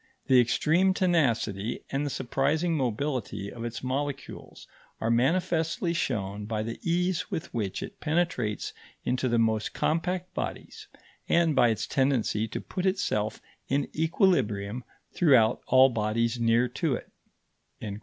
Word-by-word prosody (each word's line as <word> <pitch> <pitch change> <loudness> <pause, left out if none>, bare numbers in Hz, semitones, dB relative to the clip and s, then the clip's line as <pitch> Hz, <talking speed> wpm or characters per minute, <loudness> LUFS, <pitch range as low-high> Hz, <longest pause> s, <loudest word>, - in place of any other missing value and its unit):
The 130 -1 +5
extreme 170 +10 +2
tenacity 120 - +1
and 135 +1 0
the 145 - -1
surprising 145 +6 0
mobility 125 -5 -2
of 115 - -7
its 120 +1 -5
molecules 140 +2 -5 0.3
are 115 - 0
manifestly 165 +6 +1
shown 105 - -2
by 110 -1 -2
the 115 +1 -5
ease 180 +1 0
with 160 - -5
which 105 -5 -2
it - - -9
penetrates 155 -9 -1 0.3
into 125 +1 0
the 120 - +2
most 110 -2 +1
compact 180 +3 -1
bodies - - -5 0.4
and 170 -3 +3
by 125 -3 +5
its 110 0 -1
tendency 125 -5 +1
to - - -5
put 185 +1 -3
itself 110 - -1 0.2
in 140 +1 0
equilibrium 125 - +1 0.3
throughout 130 -10 +4
all 130 +1 +6
bodies 115 +1 0
near 115 +1 +3
to 140 +3 -1
it." - - -9
130 Hz, 135 wpm, -28 LUFS, 115-160 Hz, 0.4 s, all